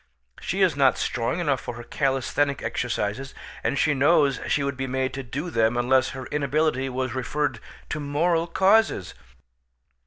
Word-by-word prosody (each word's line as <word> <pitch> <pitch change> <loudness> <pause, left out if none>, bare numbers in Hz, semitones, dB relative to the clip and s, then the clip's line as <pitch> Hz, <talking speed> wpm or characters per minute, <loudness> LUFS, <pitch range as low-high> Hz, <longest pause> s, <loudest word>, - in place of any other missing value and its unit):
She - - 0
is - - +3
not - - +4
strong 120 +8 -1
enough 140 -7 0
for - - -6
her 120 - -8
calisthenic 135 +2 0
exercises, 120 +2 -3 0.3
and 140 - 0
she 150 +2 +3
knows 145 0 +3
she 145 - +1
would 140 -1 -2
be 135 +1 -3
made 130 0 -1
to 135 - -4
do 140 +7 -5
them 115 -1 +2
unless 130 +2 +3
her 130 -2 -7
inability 145 -1 0
was 130 -1 -3
referred 145 +3 -2 0.3
to 155 - -3
moral 165 +4 +1
causes." 190 - +2
135 Hz, 160 wpm, -25 LUFS, 130-150 Hz, 0.3 s, not